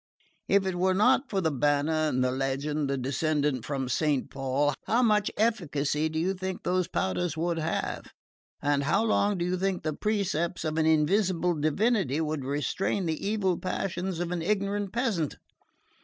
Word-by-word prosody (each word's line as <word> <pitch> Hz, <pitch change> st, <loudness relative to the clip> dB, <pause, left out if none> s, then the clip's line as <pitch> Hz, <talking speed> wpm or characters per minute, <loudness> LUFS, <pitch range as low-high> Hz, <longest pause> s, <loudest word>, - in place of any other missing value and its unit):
If 200 Hz, 0 st, +3 dB
it 190 Hz, -, 0 dB
were 185 Hz, +1 st, +2 dB
not 255 Hz, +7 st, +3 dB
for 195 Hz, -2 st, 0 dB
the 160 Hz, -3 st, +1 dB
banner, 150 Hz, +3 st, +1 dB
the 130 Hz, 0 st, +1 dB
legend, 135 Hz, +2 st, -1 dB
the 140 Hz, -, 0 dB
descent 140 Hz, 0 st, 0 dB
from 135 Hz, 0 st, -3 dB
Saint 145 Hz, +1 st, 0 dB
Paul, 135 Hz, +2 st, 0 dB
how 240 Hz, +3 st, +3 dB
much 210 Hz, -2 st, +3 dB
efficacy 160 Hz, -9 st, 0 dB
do 160 Hz, -, -4 dB
you 180 Hz, +4 st, +1 dB
think 190 Hz, 0 st, -5 dB
those 180 Hz, -1 st, +1 dB
powders 160 Hz, -, -1 dB
would 170 Hz, 0 st, 0 dB
have? 160 Hz, +1 st, -2 dB, 0.6 s
And 145 Hz, -1 st, +1 dB
how 195 Hz, +9 st, +2 dB
long 205 Hz, -3 st, +2 dB
do 175 Hz, -, -1 dB
you 180 Hz, +1 st, 0 dB
think 190 Hz, 0 st, -1 dB
the 155 Hz, -, -1 dB
precepts 185 Hz, -3 st, -1 dB
of 155 Hz, +1 st, -1 dB
an 160 Hz, -, +3 dB
invisible 175 Hz, +3 st, +2 dB
divinity 160 Hz, -, +1 dB
would 155 Hz, -3 st, -2 dB
restrain 150 Hz, +7 st, -1 dB
the 160 Hz, -2 st, -2 dB
evil 200 Hz, -4 st, 0 dB
passions 185 Hz, -1 st, -3 dB
of 175 Hz, 0 st, -2 dB
an 175 Hz, -2 st, -2 dB
ignorant 200 Hz, +1 st, -1 dB
peasant? 220 Hz, -, -1 dB
165 Hz, 170 wpm, -28 LUFS, 145-195 Hz, 0.6 s, If